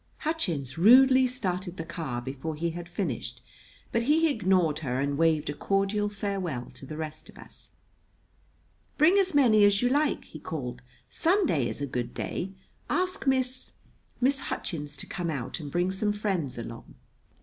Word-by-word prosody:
Hutchins 165 - -1
rudely 260 +6 +7
started 185 -7 -3
the 165 - -4
car 150 -8 -4
before 140 +5 -4
he 170 +2 -1
had 175 +1 -7
finished; - - -3 0.5
but 230 - +2
he 305 +5 +3
ignored 185 - +2
her 130 -4 -2
and 140 +1 0
waved 160 -1 +2
a 145 - -1
cordial 195 +5 0
farewell 195 - -3
to 135 - -11
the 155 - -6
rest 155 -1 -6
of - - -15
us. - - -8 1.2
"Bring 340 +7 +6
as 375 -5 +2
many 225 -7 +6
as 205 +2 +5
you 245 - +4
like," 290 +3 +1
he 155 - -10
called. 125 -6 -5 0.3
"Sunday 325 - +2
is - - -3
a - - 0
good 125 -3 -4
day. 185 - -3 0.4
Ask 365 -5 -1
Miss 260 -1 0 0.5
Miss 265 +2 +3
Hutchins 150 - -4
to - - -6
come 175 -2 -3
out 135 -3 -3
and 145 -3 -7
bring 175 +3 +1
some 205 +2 0
friends 190 - -2
along." 115 0 -8
180 Hz, 165 wpm, -28 LUFS, 150-250 Hz, 1.2 s, rudely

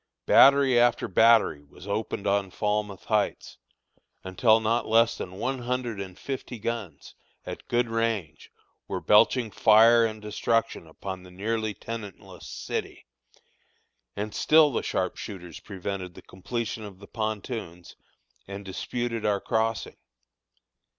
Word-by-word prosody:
Battery 135 -3 +6
after 120 0 +3
battery 110 -6 +4
was 80 +5 -15
opened 100 0 -3
on 100 -1 +1
Falmouth 105 0 -2
Heights, 105 -2 -1 0.6
until 110 +4 +3
not 115 +1 0
less 115 +1 +4
than 90 - -7
one 130 +5 -2
hundred 120 -4 -3
and 95 -2 -8
fifty 130 -3 -6
guns, 115 -4 -5 0.3
at - - -8
good 120 0 +1
range, 115 -9 -2 0.4
were - - -3
belching 115 +2 +4
fire 115 +3 +6
and 110 -1 -2
destruction 110 -2 -1
upon 95 +3 -7
the 90 - -14
nearly 110 +3 -2
tenantless 110 -2 -8
city, - - -5 1.1
and 105 +1 -4
still 155 -1 +5
the 120 - -1
sharpshooters 90 -2 -4
prevented 95 -2 -6
the - - -13
completion 110 +3 -5
of 100 -3 -9
the 100 - -13
pontoons, 110 -5 -5 0.5
and 100 0 -8
disputed 115 +4 -4
our 105 -1 +1
crossing. 110 +1 -1
110 Hz, 125 wpm, -26 LUFS, 100-115 Hz, 1.1 s, Battery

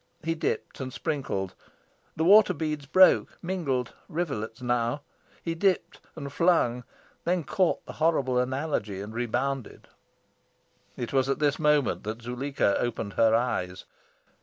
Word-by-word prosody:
He 165 +1 0
dipped 165 - -3
and 130 -1 -4
sprinkled. 100 - -3 0.6
The 160 - 0
water 200 +1 +7
beads 150 -2 -3
broke, 185 +5 +5
mingled 145 -10 -2 0.2
rivulets 140 - -3
now. 120 +2 0 0.4
He 165 - -1
dipped 180 0 0 0.2
and 140 -3 -7
flung, 125 -9 +2 0.4
then 175 -1 +1
caught 180 +4 0
the - - -8
horrible 140 -6 +2
analogy 130 -6 -2
and 105 +2 -7
rebounded. 120 +2 -3 1.1
It 120 0 -4
was 135 0 +2
at 135 - +1
this 145 -1 +1
moment 150 -3 +2
that 110 +2 -5
Zuleika 125 -3 0
opened 115 -4 -2
her 110 0 +4
eyes. 90 -7 -1
135 Hz, 135 wpm, -27 LUFS, 120-160 Hz, 1.1 s, water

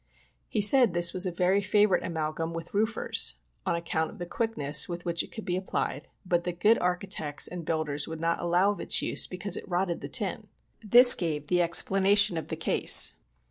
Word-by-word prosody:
He 215 - -2
said 225 0 +5
this 175 0 +2
was 185 +1 -2
a - - -3
very 180 +3 0
favorite 205 -1 +1
amalgum 160 0 -5
with 165 0 -9
roofers, 220 - 0 0.3
on - - 0
account 165 -1 -3
of - - -14
the 175 - -7
quickness 175 -9 0
with 175 0 -7
which 170 -1 -2
it - - -10
could 220 - -9
be 180 -3 -3
applied, 185 +1 -5 0.2
but 175 -1 -1
that 175 -1 -6
good 220 +4 +2
architects 180 -4 -2
and 175 -1 -8
builders 150 -2 -3
would 160 0 -8
not 165 +1 -2
allow 180 +4 +1
of 205 - -8
its - - +3
use - - -1
because 185 +1 -3
it - - -9
rotted 175 -1 -3
the - - -8
tin. - - -3 0.4
This 245 +4 +9
gave 155 -4 -5
the 175 +3 0
explanation 195 +3 +3
of 160 - -6
the - - -5
case. - - +2
175 Hz, 200 wpm, -26 LUFS, 165-200 Hz, 0.4 s, This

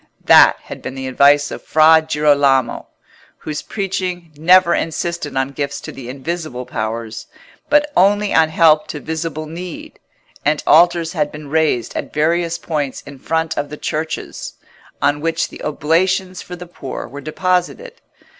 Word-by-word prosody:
That - - +7
had - - -9
been 130 - -6
the 135 0 -5
advice 145 +2 +4
of - - -6
Fra 160 +1 +5
Girolamo, 145 -5 +2 0.5
whose 150 -1 -5
preaching 185 -4 -4
never 170 +3 +5
insisted 165 -2 -3
on 135 0 0
gifts 140 0 -4
to - - -8
the 125 -2 -9
invisible 140 -1 -5
powers, 110 -1 -5 0.4
but 295 +1 +3
only 205 +2 +3
on 160 -1 +4
help 155 -1 +4
to 150 - -6
visible 160 0 -4
need; 170 +2 -8 0.4
and 150 0 0
altars 170 +1 +4
had 150 -4 -1
been 150 -1 -10
raised 155 -7 0
at - - -4
various 165 +2 +1
points 150 -6 -4
in 140 -2 -12
front 160 +2 -1
of 145 - -3
the 150 - -8
churches, 155 +2 -4 0.5
on 145 +1 +2
which 165 +1 -1
the - - -12
oblations 180 +5 0
for 180 - -8
the 180 0 -9
poor 155 -6 -7
were 140 +2 -9
deposited. 185 - -2
155 Hz, 155 wpm, -18 LUFS, 145-175 Hz, 0.5 s, That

